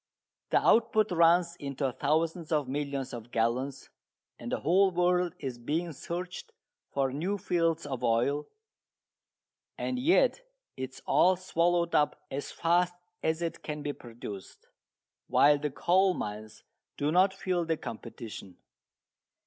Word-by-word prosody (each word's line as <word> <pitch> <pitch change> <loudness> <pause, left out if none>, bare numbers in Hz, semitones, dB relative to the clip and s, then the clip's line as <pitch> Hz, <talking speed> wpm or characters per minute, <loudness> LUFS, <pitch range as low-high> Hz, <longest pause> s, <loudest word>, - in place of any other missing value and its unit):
The - - +3
output 220 -2 +3
runs 170 0 +4
into 140 -2 -2
thousands 160 +5 -1
of 150 -4 +1
millions 140 -1 -3
of 120 -1 -7
gallons, 125 +4 -1 0.5
and - - -6
the - - -1
whole 190 +5 +4
world 180 -1 +1
is 130 -6 -5
being 165 +7 -2
searched 175 +5 -6 0.4
for 135 -2 0
new 180 +8 -1
fields 165 -3 0
of 130 -3 -5
oil, 125 +6 +1 1.3
and 255 - -2
yet 430 - +3 0.3
it 130 0 -4
is - - -14
all 185 +1 +4
swallowed 175 -1 +1
up 150 - +2
as 140 +1 -4
fast 175 +1 +1 0.3
as 160 +2 0
it 165 - -4
can 150 -1 -5
be 145 - -2
produced, 115 -6 -10 0.6
while 145 0 +5
the 150 +1 -1
coal 185 +6 +3
mines 110 +1 -6 0.3
do 145 +1 0
not 185 +3 +5
feel 185 -2 -1
the 165 -1 -1
competition. 110 -6 -8
160 Hz, 135 wpm, -29 LUFS, 135-175 Hz, 1.3 s, while